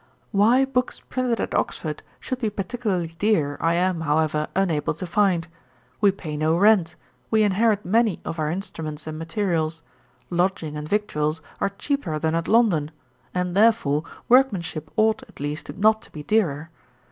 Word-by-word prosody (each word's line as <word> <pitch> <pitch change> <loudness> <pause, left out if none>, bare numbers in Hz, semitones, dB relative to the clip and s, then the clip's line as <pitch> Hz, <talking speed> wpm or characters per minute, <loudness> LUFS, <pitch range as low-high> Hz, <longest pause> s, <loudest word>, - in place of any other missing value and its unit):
'Why 230 +6 +4
books 255 -1 -1
printed 250 -2 -2
at - - -2
Oxford - - -2 0.2
should 255 - -4
be 225 -4 0
particularly 195 -4 -2
dear, 165 -9 +2
I 165 +1 +2
am, 180 -1 +1
however, 155 0 +1
unable 170 -6 +1
to 185 - -5
find. 180 -2 +1 0.5
We 205 - +5
pay 165 -6 -6
no 155 +2 +1
rent; 190 -5 +4 0.3
we 220 -1 +3
inherit 210 +1 +2
many 220 0 +2
of 165 - -4
our 155 -1 0
instruments 160 -4 -5
and 155 0 -6
materials; 165 -2 -1 0.5
lodging 175 -3 0
and 150 0 -6
victuals 160 -7 -1 0.2
are - - +1
cheaper 200 - -2
than 160 +1 0
at 165 +1 -1
London; 205 -10 +3 0.5
and, 180 0 -1
therefore, 200 -9 +3 0.2
workmanship 185 - +2
ought, 220 0 +3
at - - -16
least, 145 +3 -4
not 220 +2 +4
to - - -15
be 150 - -8
dearer. 160 -5 0
180 Hz, 160 wpm, -24 LUFS, 155-215 Hz, 0.5 s, We